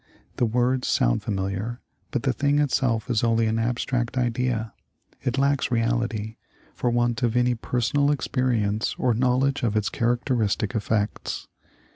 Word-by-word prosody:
The 120 - +2
words 125 +3 +1
sound - - +2
familiar, 100 +4 -3 0.3
but 130 - -2
the 135 -2 +1
thing 145 +1 +1
itself 125 -6 +1
is 120 -4 0
only 115 -1 +3
an 110 +1 0
abstract 120 +1 -1
idea; 120 -2 0 0.5
it 130 0 -1
lacks 140 0 +2
reality, 115 -2 -1 0.4
for 125 - -1
want 120 -1 +1
of 120 0 +1
any 125 0 +3
personal 125 +5 0
experience 120 -7 0
or 125 - +2
knowledge 130 +4 +1
of 110 -3 +1
its 105 - 0
characteristic 120 -3 0
effects. 105 -1 -2
120 Hz, 140 wpm, -25 LUFS, 110-125 Hz, 0.5 s, only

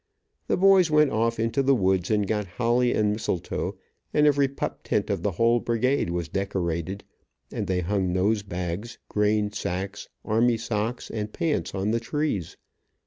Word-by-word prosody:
The - - +1
boys 190 -2 +5
went 150 -2 +4
off 115 +1 0
into 115 +5 +1
the 135 0 +4
woods 95 -4 +1
and 105 -2 +2
got 105 0 -1
holly, 120 +1 +2
and 105 -1 +2
mistletoe, 105 -5 -3 0.3
and 150 - +3
every 145 -1 +4
pup 135 - -5
tent - - -1
of - - -1
the 100 - -1
whole 115 +5 +3
brigade 120 -1 0
was 85 -1 -2
decorated, 95 -1 -2 0.5
and 100 - -3
they 90 0 0
hung 95 0 0
nose 100 +4 +1
bags, 95 +4 -5
grain 105 0 +1
sacks, 95 0 -4 0.2
army 115 +2 +3
socks 115 +1 -3
and 105 -1 -4
pants 155 -7 -1
on 95 +2 0
the 115 - +1
trees. 115 - -2
105 Hz, 165 wpm, -26 LUFS, 95-120 Hz, 0.5 s, boys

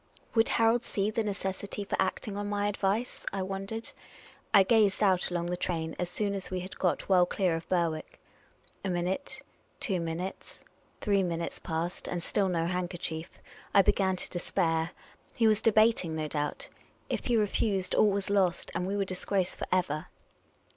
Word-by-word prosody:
Would 225 -1 +4
Harold 230 +1 +3
see 205 +1 -1
the 225 +1 0
necessity 200 0 -3
for 200 - -2
acting 195 +2 -1
on 205 0 -3
my 205 0 0
advice? 205 +4 -1
— - - -1
I 195 -1 -2
wondered. 195 +4 -4 0.6
I 200 -3 +8
gazed 210 -1 +3
out 185 -3 +3
along 175 -1 -1
the 175 +1 -1
train 165 -2 -2
as 180 - -1
soon 200 +2 -1
as 195 -1 -3
we 185 -1 -2
had 185 +2 -8
got 180 - 0
well 180 -2 +5
clear 180 -4 +1
of 165 - -6
Berwick. 170 -3 -1 0.6
A 195 - -1
min 175 -1 0
ute 190 +1 -3 0.2
— - - -38
two 190 -5 0
mi 165 -1 -2
nutes 185 +3 -7 0.2
— - - -36
three 200 -2 +3
minutes 170 -2 -2
passed; 165 +1 -3
and 175 -1 -3
still 195 0 +1
no 165 -2 0
handkerchief. 175 -2 -3 0.5
I 200 - +8
began 190 0 +2
to - - -5
despair. 165 -2 0 0.5
He 230 - +2
was 215 -1 +4
debat 225 0 +5
ing, 160 -2 -4
no 155 -1 -2
doubt. 150 0 -3 0.4
If - - -3
he 240 -2 +3
re 215 - +4
fused, 195 -2 0
all 215 - +5
was 200 0 -1
lost, 190 -4 +1
and 180 +2 -1
we 200 +1 -1
were 200 - +1
disgraced 185 0 -1
for - - -4
ever. 175 -3 0
190 Hz, 195 wpm, -30 LUFS, 175-205 Hz, 0.6 s, I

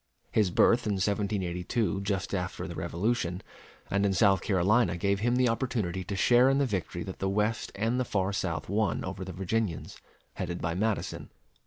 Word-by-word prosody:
His 105 -4 +3
birth 115 +6 +3
in 105 - +1
1782 100 +1 -1
just 100 -1 -2
after 90 -2 -3
the - - -6
Revolution, 90 -1 -2 0.5
and 100 +1 +2
in 100 -1 +2
South 95 0 +4
Carolina, 95 -1 +2
gave 100 +2 +1
him 120 +3 +1
the 125 0 +3
opportunity 115 -7 -1
to 100 - -4
share 120 +6 +5
in 135 - +3
the 140 - +3
victory 95 -6 -3
that 95 - -8
the 95 - 0
West 105 +3 0
and 115 +5 0
the - - +2
far 100 -4 -1
South 80 -7 -2
won 100 -1 0
over 95 0 -5
the 95 - -6
Virginians, 95 0 -3 0.3
headed 85 -1 -4
by 85 - -1
Madison. 105 +4 -2
100 Hz, 180 wpm, -29 LUFS, 90-110 Hz, 0.5 s, share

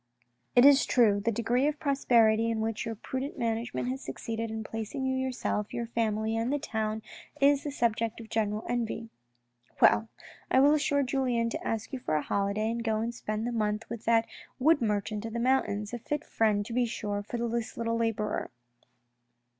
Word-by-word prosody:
" 120 +1 -46
It 245 +1 +7
is 280 -1 +7
true, 215 -5 +4
the 230 - +2
degree 235 +5 +1
of 300 -1 -2
prosperity 230 -6 +3
in 225 -1 -1
which 220 +1 -2
your 225 - -3
prudent 260 +6 -5
management 230 +1 -2
has 265 +1 -3
succeeded 225 0 -4
in 220 0 -4
placing 225 +5 -4
you 260 0 0
yourself, 255 -5 -2
your 235 - -2
family 220 -1 -1
and 230 +3 0
the 290 - +2
town 220 -6 -3 0.4
is 280 0 +4
the 295 - -3
subject 230 -4 0
of 225 - -9
general 215 -1 -1
envy.... 230 -1 -2 0.7
Well, 105 +2 +5 0.4
I 260 - +4
will 285 +2 +6
urge 300 -1 +1
Julien 245 -3 0
to - - -4
ask 225 +4 -3
you 265 - -3
for 155 -11 -1
a 150 - +1
holiday 200 +5 0
to 235 - -3
go 220 -2 0
and 230 +2 -2
spend 215 -1 -3
the 240 - -1
month 215 -1 -1
with 230 -1 -6
that 230 0 +4 0.3
wood 290 +2 +4
merchant 210 -1 -1
of 225 - -5
the 235 - -2
mountains, 215 -4 +1
a 240 - -3
fit 295 +6 -3
friend 210 -2 +1
to 230 - -6
be 245 0 +2
sure 205 -2 -3
for 220 +4 -5
this 235 0 -2
little 230 0 -1
labourer." 225 -2 -1
230 Hz, 195 wpm, -29 LUFS, 215-245 Hz, 0.7 s, It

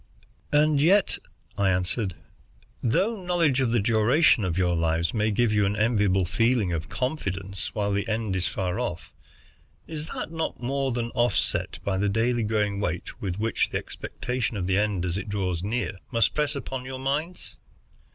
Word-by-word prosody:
"And 150 -1 +4
yet," 190 +6 +4 0.4
I 100 -1 +3
answered, 90 +1 0 0.7
"though 190 - +1
knowledge 165 -7 +2
of 130 - +2
the 120 - +3
duration 115 +5 +4
of 90 -2 -1
your 90 -2 +2
lives 85 0 +1
may 110 -1 +1
give 110 +1 +2
you 105 -1 +3
an 100 - 0
enviable 105 -4 +2
feeling 115 -1 +2
of 80 -3 -3
confidence 95 - -3
while 105 -1 0
the 100 +3 -1
end 110 -3 -1
is 90 -2 0
far 90 -1 -2
off, 85 -1 -4 0.7
is 155 -1 -6
that - - -5
not 160 -1 -3
more 135 +2 -1
than 120 -1 -2
offset 120 0 +1
by 95 -1 0
the 100 +1 +2
daily 115 +3 +1
growing 105 -2 0
weight 90 -4 -3
with 95 -3 -2
which 110 +2 0
the - - -1
expectation 125 -3 -4
of 90 - -2
the 95 +1 +2
end, 100 -4 0
as 90 +2 -1
it 100 - -7
draws 95 -4 -1
near, 100 -3 -2
must 115 -3 +2
press 150 -1 0
upon 135 -2 -4
your 130 0 -6
minds?" 145 +7 -3
110 Hz, 175 wpm, -26 LUFS, 95-130 Hz, 0.7 s, And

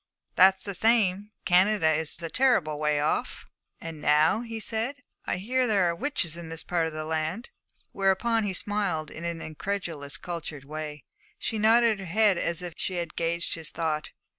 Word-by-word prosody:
'That's 190 0 +6
the 200 - -3
same. 205 -1 +2 0.2
Canada 185 0 +4
is 160 0 0
a - - -1
terrible 160 - +2
way 150 -1 +1
off.' 150 - -1 0.3
'And 165 -2 -8
now,' 150 +9 +4
he 230 -2 -6
said, 225 +5 -1 0.3
'I - - 0
hear 250 +7 0
there 205 -4 +3
are 170 - +1
witches 180 - -1
in 170 -1 -7
this 165 0 -4
part 170 -2 0
of 160 - -6
the 155 0 -4
land.' 160 +8 -3 0.4
Whereupon 200 +4 +1
he 195 - -2
smiled 185 -6 -1
in 165 - -7
an 170 -1 -3
incredulous 160 -3 -4
cultured 160 -5 -6
way. 150 -1 -6 0.3
She 220 - -3
nodded 225 0 +4
her 195 - -6
head 200 0 +3
as 170 +1 0
if 175 -2 -6
she 185 - -3
had 170 -2 -4
gauged 170 +1 -1
his 165 -2 -4
thought. 155 -2 -2
175 Hz, 180 wpm, -27 LUFS, 160-210 Hz, 0.4 s, That's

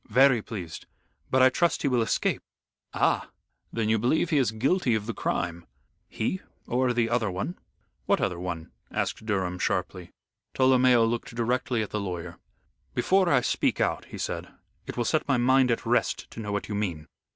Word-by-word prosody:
"Very 125 +1 +5
pleased. 90 -8 -7 0.4
But 130 0 +4
I 130 - +8
trust 170 +6 +1
he - - +2
will 125 -3 +2
escape." 110 - 0 0.5
"Ah! - - +1 0.4
Then 115 -2 -1
you 110 0 +2
believe 155 - +1
he 150 - +4
is 130 - +2
guilty 125 - +1
of 105 -1 -2
the 115 - -3
crime." 85 -4 -2 0.4
"He 185 +12 -2 0.2
or 125 +1 +1
the 120 -1 +1
other 115 -2 +1
one." 100 - -4 0.5
"What - - +3
other 85 - -1
one?" 90 -3 -5 0.2
asked - - -2
Durham, 95 -3 -1
sharply. 90 -1 -2 0.5
Tolomeo 130 -2 +5
looked 115 0 -3
directly 120 0 0
at 105 - -7
the 105 - -1
lawyer. 90 -4 -5 0.6
"Before 190 -1 +3
I 135 -5 +4
speak - - 0
out," - - 0
he - - -9
said, - - -3 0.4
"it - - -6
will 120 - 0
set 155 +6 +1
my 135 -3 +3
mind 130 +1 +4
at 115 - 0
rest - - 0
to - - -9
know 105 -2 -4
what 100 0 -2
you 105 - -4
mean." 90 -7 -2
115 Hz, 185 wpm, -27 LUFS, 100-130 Hz, 0.6 s, I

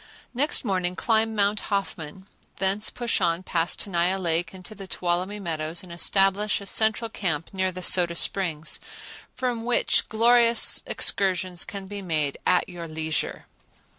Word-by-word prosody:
Next 270 +1 +2
morning 185 -3 0
climb 225 +1 +1
Mount 205 0 +2
Hoffman; 190 -3 -4 0.3
thence 195 +2 0
push 235 -3 -1
on 170 0 +1
past 170 -2 0
Tenaya 180 -1 +1
Lake 170 -2 -1
into 190 +2 -10
the 195 -2 -10
Tuolumne 180 +3 -2
Meadows 165 -1 -3
and 180 - -12
establish 195 +4 +2
a 200 - -9
central 220 +3 +2
camp 165 -8 -3
near 190 -1 0
the 185 0 -7
Soda 175 -1 +3
Springs, 170 -4 0 0.6
from 245 -3 -2
which 245 +1 +2
glorious 235 +1 +4
excursions 185 -2 +1
can 200 -1 -8
be 200 +1 -6
made 155 -6 -1
at 180 -1 +3
your 175 -2 -8
leisure. 160 0 -2
190 Hz, 145 wpm, -25 LUFS, 170-210 Hz, 0.6 s, glorious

